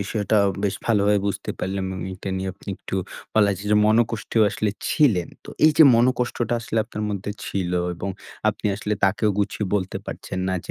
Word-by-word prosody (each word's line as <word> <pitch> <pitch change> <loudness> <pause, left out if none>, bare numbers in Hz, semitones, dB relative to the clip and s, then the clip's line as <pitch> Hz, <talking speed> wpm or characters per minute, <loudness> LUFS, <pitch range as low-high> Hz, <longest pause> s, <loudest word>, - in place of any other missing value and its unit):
বিষয়টা 105 +1 0 0.3
বেশ 100 - +1
ভালোভাবে 105 -2 +3
বুঝতে 100 - -3
পারলাম 95 0 -2
আমি। 95 - -5
এইটা 95 +1 -6
নিয়ে 95 0 -2 0.3
একটু - - -7 0.4
বলা 105 -2 +5
যায় 100 +3 -8
যে 105 - +5
মনকষ্টেও 115 0 +2
আসলে 105 -1 -1 0.2
ছিলেন। 105 - +3 0.2
তো - - -9
এই 155 - +7
যে 160 - +10
মনকষ্টটা 120 -1 +1
আসলে 115 -1 -2
আপনার 105 -1 -6
মধ্যে 100 0 -3 0.2
ছিল 90 -2 -2 0.2
এবং 95 +3 -4 0.4
আপনি - - -2
আসলে 105 0 -3
তাকেও 105 +2 +2
গুছিয়ে 105 0 -1
বলতে 95 -1 -1
পারছেন 95 - -6
না 95 - 0
যে - - -7
105 Hz, 180 wpm, -23 LUFS, 95-110 Hz, 0.4 s, যে